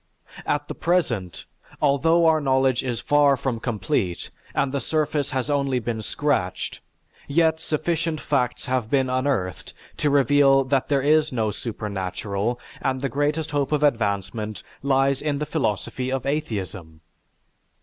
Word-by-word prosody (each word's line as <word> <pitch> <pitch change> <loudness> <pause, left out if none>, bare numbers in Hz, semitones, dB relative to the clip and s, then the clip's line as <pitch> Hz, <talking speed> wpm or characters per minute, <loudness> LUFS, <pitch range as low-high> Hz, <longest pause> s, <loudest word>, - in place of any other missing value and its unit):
At 145 0 0
the - - -4
present, 125 - -1 0.3
although 160 +4 +3
our 160 -1 +4
knowledge 130 -2 +2
is 120 -3 -2
far 145 0 +4
from 125 -4 -2
complete 95 -6 -2 0.2
and 140 -1 +1
the 140 -1 -1
surface 150 -2 0
has 130 0 -2
only 140 -3 +1
been 115 -2 -3
scratched, 105 -7 -1 0.5
yet 160 +2 +2
sufficient 160 0 -1
facts 125 -5 -1
have 130 -4 -1
been 130 -1 +2
unearthed 130 - -1 0.2
to 150 - +1
reveal 140 0 +5
that 135 0 0
there 140 -2 +2
is 155 +1 +3
no 110 -4 0
supernatural 100 +1 -3 0.2
and 130 -1 -1
the 135 - -1
greatest 150 +3 -1
hope 145 -2 0
of 150 -1 +1
advancement 105 -4 0 0.2
lies 135 0 +2
in 145 -2 -1
the 150 - -2
philosophy 130 -2 -2
of 135 -1 -2
atheism. 100 - -4
135 Hz, 140 wpm, -24 LUFS, 115-145 Hz, 0.5 s, reveal